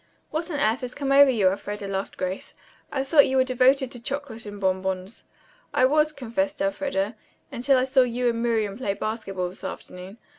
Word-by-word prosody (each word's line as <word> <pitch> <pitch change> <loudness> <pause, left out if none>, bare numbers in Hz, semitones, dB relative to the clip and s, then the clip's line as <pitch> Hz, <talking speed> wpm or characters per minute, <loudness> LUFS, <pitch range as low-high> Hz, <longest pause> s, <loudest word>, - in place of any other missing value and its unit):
"What 320 +3 -2
on 295 -4 -2
earth 240 -2 +1
has 250 -1 -6
come 275 -1 -2
over 280 0 +8
you, 210 -7 +3
Elfreda," 205 +1 -4
laughed 195 0 -4
Grace. 185 +1 -4 0.4
"I 270 - -1
thought 285 +1 +5
you 265 - +1
were 260 - +5
devoted 260 +1 +3
to 245 - -8
chocolate 255 -4 -5
and 205 0 -8
bonbons." 190 +1 -2 0.5
"I 255 - +5
was," 305 +3 +3
confessed 285 +2 -2
Elfreda, 275 -8 -1 0.4
"until 265 +3 +2
I 255 - +3
saw 265 0 +4
you 250 0 0
and 230 -1 0
Miriam 220 -3 0
play 200 -6 -1
basketball 195 -4 -3
this 185 - -13
afternoon. 185 +4 -8
245 Hz, 190 wpm, -25 LUFS, 200-275 Hz, 0.5 s, over